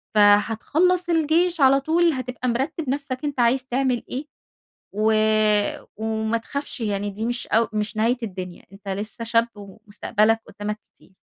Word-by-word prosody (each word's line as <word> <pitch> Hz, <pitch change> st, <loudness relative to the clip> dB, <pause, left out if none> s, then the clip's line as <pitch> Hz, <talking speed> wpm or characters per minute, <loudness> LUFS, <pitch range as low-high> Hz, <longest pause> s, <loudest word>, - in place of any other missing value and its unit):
فهتخلّص 225 Hz, -, +3 dB
الجيش 335 Hz, +1 st, +2 dB
على 270 Hz, 0 st, +6 dB
طول، 330 Hz, +3 st, +2 dB
هتبقى 255 Hz, -1 st, -3 dB
مِرتِّب 270 Hz, +5 st, -2 dB
نفسك 275 Hz, -1 st, -3 dB
أنت 285 Hz, -3 st, -3 dB
عايز 255 Hz, +2 st, +2 dB
تعمل 255 Hz, -1 st, 0 dB
إيه. 270 Hz, +4 st, -4 dB, 0.7 s
و 220 Hz, +1 st, +3 dB, 0.8 s
وما 220 Hz, +1 st, -1 dB
تخافش، 280 Hz, +4 st, -6 dB
يعني 205 Hz, -2 st, -1 dB
دي 210 Hz, +3 st, -5 dB
مش 240 Hz, +1 st, -3 dB
أو 225 Hz, 0 st, +2 dB
مش 215 Hz, 0 st, -2 dB
نهاية 230 Hz, +4 st, +2 dB
الدنيا. 185 Hz, -4 st, -6 dB
أنت 195 Hz, +1 st, -15 dB
لسّه 210 Hz, +4 st, -5 dB
شاب 230 Hz, 0 st, +2 dB
ومستقبلك 210 Hz, +2 st, -1 dB
قدّامك 210 Hz, 0 st, -5 dB, 0.2 s
كتير. 190 Hz, -, -24 dB
230 Hz, 145 wpm, -23 LUFS, 210-275 Hz, 0.8 s, على